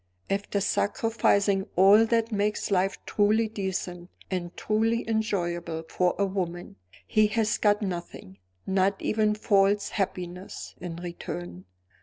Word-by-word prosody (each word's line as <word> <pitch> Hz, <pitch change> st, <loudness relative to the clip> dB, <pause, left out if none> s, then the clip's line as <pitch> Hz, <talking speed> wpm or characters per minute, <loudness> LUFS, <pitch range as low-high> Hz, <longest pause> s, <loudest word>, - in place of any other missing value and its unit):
"After 200 Hz, +1 st, -1 dB
sacrificing 200 Hz, -2 st, +1 dB
all 200 Hz, +5 st, +6 dB
that 230 Hz, 0 st, +1 dB
makes 210 Hz, 0 st, -1 dB
life 190 Hz, 0 st, +1 dB
truly 215 Hz, +2 st, +2 dB
decent 185 Hz, -4 st, -4 dB, 0.2 s
and 180 Hz, -1 st, -4 dB
truly 225 Hz, +2 st, 0 dB
enjoyable 175 Hz, -7 st, -1 dB
for 180 Hz, -1 st, +1 dB
a 200 Hz, -, +2 dB
woman, 180 Hz, -3 st, -4 dB, 0.3 s
he 215 Hz, 0 st, +3 dB
has 220 Hz, 0 st, 0 dB
got 210 Hz, 0 st, +3 dB
nothing, 170 Hz, -, -6 dB, 0.3 s
not 190 Hz, +1 st, +1 dB
even 215 Hz, -1 st, +1 dB
false 205 Hz, -1 st, +2 dB
happiness, 180 Hz, -2 st, -4 dB
in 175 Hz, -1 st, -5 dB
return!" 90 Hz, -, -7 dB
195 Hz, 120 wpm, -27 LUFS, 180-215 Hz, 0.3 s, all